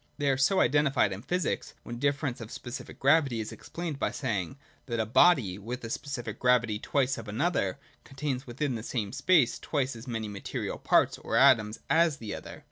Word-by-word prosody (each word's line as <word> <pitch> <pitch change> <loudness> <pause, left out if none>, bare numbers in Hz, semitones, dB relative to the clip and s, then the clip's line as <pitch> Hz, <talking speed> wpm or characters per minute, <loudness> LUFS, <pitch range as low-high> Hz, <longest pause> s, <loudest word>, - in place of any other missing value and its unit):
They 145 -2 +2
are - - +2
so 140 +9 +3
identified 135 -6 +3
in 95 - -7
physics, 180 +6 -2
when 120 0 -7
differ 140 +2 0
ence 125 -3 -3
of 110 - -7
specific 120 +3 -8
gravity 140 -4 +3
is 110 - -4
explained 165 -5 -6
by - - +1
saying, 130 -2 -3 0.3
that 120 -2 -2
a 110 - +1
body, 120 - +4
with 120 +5 -6
a 115 - -5
specific 120 -6 -5
gravity 120 -4 +2
twice 135 +2 +1
that - - -5
of 110 - -14
another, 140 - 0 0.3
contains 135 -1 -4
within 130 +3 -2
the 115 - -4
same 110 -4 -3
space 155 -10 +3
twice 135 -4 -1
as 115 +3 -10
many 115 -3 -3
material 100 -2 -5
parts - - +3
(or - - -3
atoms) 105 -1 +4
as 165 -3 +3
the 110 -5 -6
other. - - -8
125 Hz, 200 wpm, -29 LUFS, 115-145 Hz, 0.3 s, body